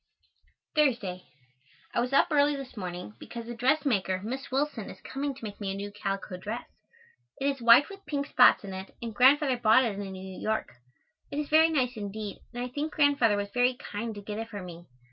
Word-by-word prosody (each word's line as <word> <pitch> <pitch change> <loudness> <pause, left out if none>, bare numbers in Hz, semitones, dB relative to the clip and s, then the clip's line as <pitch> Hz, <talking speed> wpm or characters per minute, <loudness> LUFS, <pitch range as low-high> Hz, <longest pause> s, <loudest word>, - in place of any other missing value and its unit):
Thursday. 235 - +1 0.7
I - - +1
was 245 +2 0
up 275 - +4
early 290 0 +4
this 270 -3 -8
morning 180 - -6
because 235 -1 -8
a 240 - -5
dressmaker, 240 -7 +1
Miss 260 +5 -5
Willson, 270 -5 -1
is - - -10
coming 275 0 -4
to 255 - -14
make 210 -1 -7
me 200 - -2
a - - -4
new 200 +1 -5
calico 195 -2 -4
dress. 215 +6 -5 0.7
It 275 - -2
is 275 -2 0
white 235 +4 +7
with 395 0 -11
pink 285 -2 -1
spots 250 -5 +5
in 195 -1 -6
it 190 +1 -8
and 230 -2 -5
Grandfather 265 +3 +5
bought 235 +2 +5
it 205 -3 -2
in 195 -1 -5
New 190 0 -8
York. 220 - -1 0.6
It 285 - -5
is 300 -1 -2
very 320 +1 +6
nice 255 -6 0
indeed 205 0 -5
and 245 0 -4
I 250 - -4
think 295 +4 -3
Grandfather 280 -8 +4
was 200 0 -3
very 250 +2 +2
kind 225 -1 -5
to 205 - -8
get 210 +1 -5
it 225 0 -5
for 205 -4 -6
me. 175 -1 -10
235 Hz, 210 wpm, -28 LUFS, 205-275 Hz, 0.7 s, white